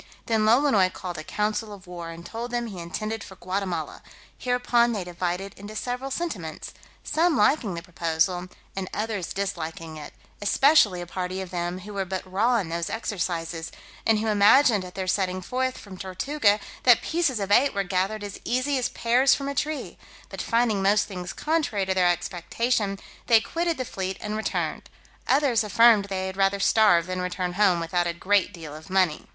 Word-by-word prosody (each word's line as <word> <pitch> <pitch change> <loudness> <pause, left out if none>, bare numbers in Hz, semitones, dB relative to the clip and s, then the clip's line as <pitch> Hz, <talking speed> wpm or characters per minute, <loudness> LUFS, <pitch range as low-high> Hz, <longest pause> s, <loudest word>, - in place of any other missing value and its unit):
Then 225 -3 +1
Lolonois 220 -5 +4
called 175 -3 -6
a - - -6
council 210 +4 -2
of 200 -1 -11
war, 175 -2 -7
and 165 +1 -9
told 235 +2 -5
them, 240 -1 -2
he 200 -6 -7
intended 215 +6 -4
for 190 - -11
Guatemala: 185 0 -3 0.3
hereupon 245 -1 +2
they 205 -4 -2
divided 180 +2 -3
into 205 +2 -9
several 250 +4 -3
sentiments, 220 - -4 0.3
some 325 -1 +2
liking 210 - +2
the 170 - -6
proposal, 175 +1 -1 0.3
and 190 -1 -4
others 210 -4 -3
disliking 165 -5 -4
it, 150 - -9 0.3
especially 205 - +4
a - - -5
party 185 +1 -4
of 190 -1 -6
them 175 +1 -3
who 205 +3 -9
were 195 -1 -1
but 190 0 -4
raw 210 +7 +1
in 190 -7 -2
those 170 0 -2
exercises, 170 -6 -3 0.3
and 225 -1 +3
who 215 - -2
imagined 215 +1 +5
at 180 0 -10
their 190 - -3
setting 185 0 0
forth 255 +7 -2
from 190 -3 -11
Tortuga 205 +3 +1 0.2
that 245 -3 +5
pieces 315 -8 0
of 200 0 -3
eight 255 +3 +4
were 200 - +1
gathered 195 +3 -1
as 200 -1 -7
easy 255 +3 0
as 250 - 0
pears 250 +3 +3
from 275 - -5
a 280 - -2
tree; 300 +2 -3 0.3
but - - -5
finding 230 -4 +1
most 200 +2 +3
things 180 -3 -6
contrary 300 -11 0
to 190 - 0
their 185 -1 +3
expectation, 195 +5 -1 0.3
they 230 -2 +7
quitted 335 +7 -2
the 255 - -3
fleet, 190 -3 -4
and 210 0 -4
returned; 220 - -2 0.4
others 265 -5 +3
affirmed 215 0 +5
they 190 -1 -3
had 190 0 -5
rather 195 0 +2
starve 195 -5 +4
than 185 0 -3
return 180 0 -2
home 190 -3 +3
without 175 +1 0
a 170 - -1
great 200 +4 +1
deal 160 -6 -9
of 155 +3 -12
money. 185 -5 +1
200 Hz, 185 wpm, -25 LUFS, 180-230 Hz, 0.4 s, they